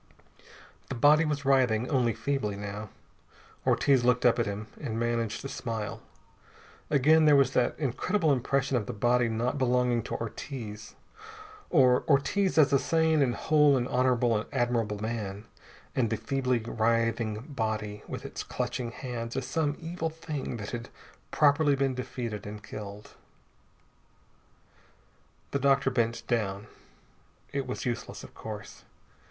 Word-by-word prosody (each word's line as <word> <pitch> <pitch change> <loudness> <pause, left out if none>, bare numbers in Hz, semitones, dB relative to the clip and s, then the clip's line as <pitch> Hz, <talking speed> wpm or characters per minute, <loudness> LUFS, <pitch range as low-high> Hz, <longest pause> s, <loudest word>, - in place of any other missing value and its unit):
The 135 - -3
body 150 +5 +5
was 145 -2 -2
writhing 125 -4 +3
only 125 -7 +1
feebly, 135 -8 -1
now. 105 +1 -6 0.8
Ortiz 135 -3 +4
looked 125 0 +2
up 120 0 +5
at 115 - +1
him, 100 +2 -4 0.2
and 115 -6 -3
managed 115 +1 -1
a - - -1
smile. 115 -5 -4 0.9
Again 155 +2 +5
there 150 -1 +7
was 135 -2 +4
that 125 - +1
incredible 155 - +1
impression 135 +1 0
of 105 -4 -3
the - - -4
body 120 +2 +2
not 120 +5 -1
belonging 125 -2 +2
to - - -4
Ortiz, 110 -2 -6 0.7
or 130 -6 +4
Ortiz 165 +7 +2
as 150 -2 +5
a 140 - +5
sane 160 +2 +2
and 125 -3 +2
whole 150 -3 +4
and 125 -1 -1
honorable, 125 -3 +2
admirable 120 -5 0
man, 105 -2 -4 0.5
and 120 -4 +2
the 115 - -1
feebly 130 -1 0
writhing 115 -1 0
body 110 -5 -3
with - - -6
its - - -5
clutching 125 -2 -3
hands 120 -1 -5
as 135 - -2
some 145 +2 -1
evil 165 0 -3
thing 155 -6 -5
that 100 -2 -6
had 120 0 -5 0.4
properly 145 -1 +4
been 135 -1 +1
defeated 120 -5 -5
and 105 0 -8
killed. 105 0 -8 2.4
The 140 - 0
doctor 135 0 +3
bent 115 -2 0
down. 105 -4 -1 0.9
It 140 -2 -2
was 125 - -4
useless, 120 -1 -4
of - - -12
course. - - -8
125 Hz, 140 wpm, -29 LUFS, 115-140 Hz, 2.4 s, there